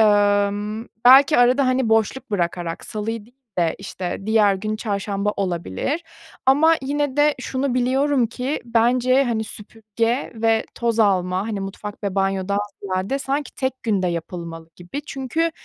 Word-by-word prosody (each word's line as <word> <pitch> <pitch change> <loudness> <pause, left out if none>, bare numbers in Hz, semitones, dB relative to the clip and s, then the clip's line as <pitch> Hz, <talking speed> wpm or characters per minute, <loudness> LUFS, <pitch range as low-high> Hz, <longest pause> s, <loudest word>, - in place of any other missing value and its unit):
Imm, 205 +1 +2 0.2
belki 270 +3 +8
arada, 250 +3 +4
hani, 255 -2 +1
boşluk 225 +3 +1
bırakarak, 175 -3 -2
salıyı 215 0 -4
değil 245 +2 -24 0.2
de, 170 -2 +2
işte, 190 -2 -5
diğer 215 -2 +4
gün 215 +3 -3
çarşamba 205 -1 -2
olabilir 190 - -2 0.4
ama 310 +5 +5
yine 285 0 -1
de 295 0 +4
şunu 260 0 -2
biliyorum 260 +1 +2
ki 250 +5 -3
bence, 245 +3 +3
hani, 225 -3 -1
süpürge 225 +3 -3
ve 225 0 +1
toz 235 -1 -1
alma, 190 -1 +1
hani, 210 -3 -3
mutfak 205 +2 -7
ve 200 -2 -2
banyodan 195 0 0 0.2
ziyade 195 +7 -1
sanki 275 0 -2
tek 260 -1 -3
günde 200 -5 +1
yapılmalı 170 -1 -6
gibi 180 +12 -7
çünkü 275 +5 -1
220 Hz, 140 wpm, -22 LUFS, 200-260 Hz, 0.4 s, belki